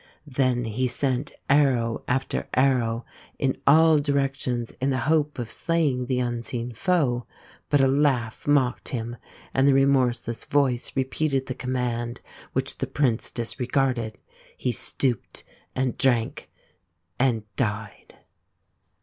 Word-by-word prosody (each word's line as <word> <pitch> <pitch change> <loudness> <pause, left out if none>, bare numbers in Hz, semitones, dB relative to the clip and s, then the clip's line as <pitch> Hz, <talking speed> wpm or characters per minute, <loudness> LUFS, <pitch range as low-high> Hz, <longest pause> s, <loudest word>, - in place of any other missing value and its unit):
Then 130 -3 0
he 120 +4 -1
sent 130 +2 -1
arrow 130 -5 +2
after 130 +2 -1
arrow 125 -3 +2 0.3
in 135 -2 0
all 160 +1 +6
directions 135 -4 -1
in 135 - +1
the 130 -1 0
hope 150 -1 +1
of 120 -2 -4
slaying 150 -7 0
the 130 -1 0
unseen 120 0 -2
foe; 130 - +1 0.4
but 145 - +4
a 135 - +5
laugh 130 -5 +1
mocked 140 -4 +2
him 120 -2 -4 0.4
and 135 +1 +3
the 140 - +5
remorseless 125 -4 +2
Voice 135 -4 +1
repeated 135 +1 0
the 130 - -4
command, 125 -2 -3 0.3
which 130 +1 -2
the 135 - -1
Prince 130 -4 +1
disregarded; 125 -1 -1 0.4
he 125 - -1
stooped, 120 +2 -1 0.3
and 130 -1 -1
drank, 120 -4 +1 0.7
and 120 -4 +2
died. 105 -4 -3
130 Hz, 125 wpm, -25 LUFS, 120-140 Hz, 0.7 s, all